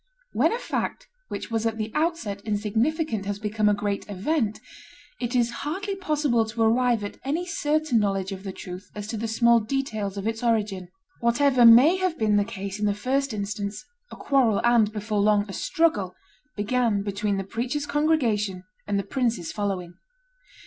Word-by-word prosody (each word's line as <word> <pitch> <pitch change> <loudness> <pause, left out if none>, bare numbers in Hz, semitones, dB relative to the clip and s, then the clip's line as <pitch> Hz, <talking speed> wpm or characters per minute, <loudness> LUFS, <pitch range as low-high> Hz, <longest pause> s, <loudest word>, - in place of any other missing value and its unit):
When - - +3
a 465 - 0
fact - - -3 0.2
which - - -6
was 225 0 0
at 225 -1 -2
the 215 0 -3
outset 305 - -1
insignificant 220 - -1
has 205 -1 -2
become 210 0 +1
a 205 - +3
great 205 -1 -2
event, 215 - -1 0.6
it 240 0 -2
is 240 -1 +2
hardly 385 +7 -3
possible 300 -11 +1
to 225 +1 -2
arrive 235 0 +3
at 205 - -6
any 315 +6 -1
certain 305 -6 +1
knowledge 195 -2 -1
of 190 -1 -6
the 195 - -4
truth 185 +1 -9
as 205 -1 -5
to 225 - -3
the 225 +2 -2
small 235 +1 +4
details 215 -4 -3
of 200 - -4
its 225 0 -2
origin. 210 -6 0 0.3
Whatever 245 +1 +4
may 260 +11 +8
have 370 -3 -1
been 215 -2 +2
the 205 - +3
case 200 -1 -6
in 210 - +1
the 205 - +1
first 270 +5 0
instance, 205 0 -4 0.3
a - - -8
quarrel, 255 -7 +2
and, 235 -3 +4
before 210 0 -2
long, 205 0 +3
a 195 - -7
struggle, 265 - 0 0.4
began 215 -1 +1
between 200 0 -1
the 195 - -2
preacher's 245 +8 -3
congregation 235 - +1 0.2
and 205 -1 0
the 200 - 0
prince's 235 -10 -1
following. 190 -4 -3
220 Hz, 175 wpm, -25 LUFS, 205-265 Hz, 0.6 s, may